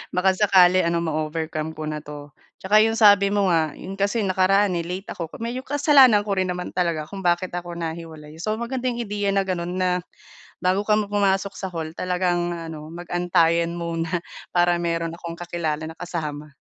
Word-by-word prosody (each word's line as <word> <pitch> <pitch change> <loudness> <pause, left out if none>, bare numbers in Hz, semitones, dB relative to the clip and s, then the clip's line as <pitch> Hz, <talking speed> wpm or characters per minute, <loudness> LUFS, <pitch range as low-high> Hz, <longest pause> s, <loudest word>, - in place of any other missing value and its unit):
Baka 190 +1 +3
sakali 185 -3 +5
ano, 170 0 +1
ma-overcome 155 0 -3
ko 155 - -7
na 150 0 -3
'to. 145 -1 -9 0.3
Tsaka 205 +3 +4
'yong 225 +1 +2
sabi 205 -2 +6
mo 200 -2 +2
nga, 160 -3 +1
'yon 195 +1 -8
kasi 200 +3 0
nakaraan 190 0 +2
eh 170 - -3
late 185 +3 -6
ako 170 - -5
medyo 240 +3 -3
kasalanan 275 -6 +5
ko 200 -2 -2
rin 185 0 +1
naman 180 0 -4
talaga 170 -4 -1
kung 195 -1 -7
bakit 175 +1 +1
ako 175 -1 -5
nahiwalay. 160 -2 -7
So 215 +5 -1
magandang 245 +1 -2
ideya 205 -2 -2
na 195 0 +2
gano'n 180 -2 -3
na, 185 0 +1 0.7
bago 185 +2 +2
ka 210 - +4
pu 210 - -1
pumasok 200 -1 +1
sa 190 - -4
hall, 160 -1 -4
talagang 180 -1 0
ano, 160 -2 -7
mag-antayan 170 -1 +1
muna 165 -1 -3 0.4
para 175 0 +3
meron 165 -1 -1
akong 170 -1 -7
kakilala 165 -3 -3
na 160 - -11
kasama. 150 -4 -5
175 Hz, 180 wpm, -23 LUFS, 165-195 Hz, 0.7 s, sabi